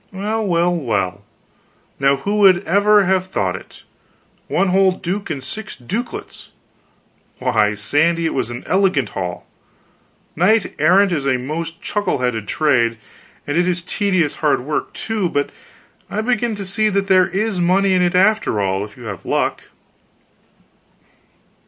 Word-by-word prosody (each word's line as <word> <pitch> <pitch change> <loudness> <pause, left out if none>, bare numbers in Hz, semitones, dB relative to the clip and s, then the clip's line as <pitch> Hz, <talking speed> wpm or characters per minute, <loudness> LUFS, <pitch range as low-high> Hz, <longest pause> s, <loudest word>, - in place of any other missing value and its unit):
"Well, 210 +3 -2
well, 175 0 +2
well, 110 - -2 0.8
now 135 +1 +3
who 200 +10 -2
would 190 -3 +5
ever 205 +2 +4
have 185 0 +1
thought 185 - -1
it? - - -12 0.6
One 195 - +1
whole 190 0 +3
duke 190 +2 -4
and 140 -5 -4
six 215 +8 -6
dukelets; 205 - -6 0.9
why, 105 0 +1
Sandy, 165 +10 +1
it 160 - 0
was 130 - -1
an 120 +1 -7
elegant 185 - +1
haul. 90 -2 -5 0.9
Knight 195 +5 +2
errantry 180 +1 +4
is 140 - -4
a 130 -2 +2
most 165 +6 -5
chuckle 205 0 -1
headed 120 -4 -2
trade, 120 -7 +1 0.5
and 145 - -3
it 175 +1 +2
is 180 -1 0
tedious 185 -5 0
hard 150 -5 +1
work, 145 +4 -3
too, 215 -5 -2
but 145 -2 -1 0.6
I 210 - -2
begin 240 -1 0
to 200 -1 -6
see 215 +3 +1
that 200 -1 0
there 185 -1 +4
is 205 -1 -1
money 190 +2 +3
in 185 - +3
it, 175 0 +1
after 195 - +2
all, 95 0 0
if 105 -1 -11
you 125 - -11
have 105 -5 -7
luck. - - -1
180 Hz, 150 wpm, -19 LUFS, 140-200 Hz, 0.9 s, would